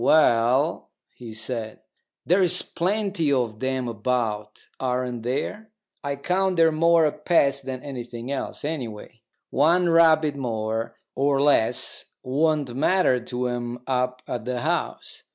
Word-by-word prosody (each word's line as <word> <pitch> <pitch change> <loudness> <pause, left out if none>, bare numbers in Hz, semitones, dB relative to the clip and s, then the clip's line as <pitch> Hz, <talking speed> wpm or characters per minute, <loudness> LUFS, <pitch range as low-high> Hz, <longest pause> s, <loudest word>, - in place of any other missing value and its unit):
"Well," 130 +1 +3 0.3
he 120 -2 -9
said, 110 0 -4 0.4
"there's 180 0 +3
plenty 190 -3 -1
of 120 -5 0
them 130 -1 -1
about, 110 -2 -2
aren't 125 -2 -2
there? 140 - -3 0.3
I 140 0 -2
count 185 +6 0
they're 165 -1 +5
more 165 +1 +4
a 150 - +2
pest 140 -4 +1
than 130 -1 -5
anything 120 -2 -6
else. 140 - -4
Anyway, 120 -7 -6 0.3
one 170 +5 +3
rabbit 160 -3 +5
more 115 -3 -3 0.2
or 140 0 +1
less 140 -6 +2 0.2
won't 145 0 +1
matter 145 -2 +3
to 125 +1 -3
'em 120 0 -4
up 125 -1 -1
at 120 -2 -4
the 125 -1 -2
House. - - -3
130 Hz, 130 wpm, -24 LUFS, 120-155 Hz, 0.4 s, they're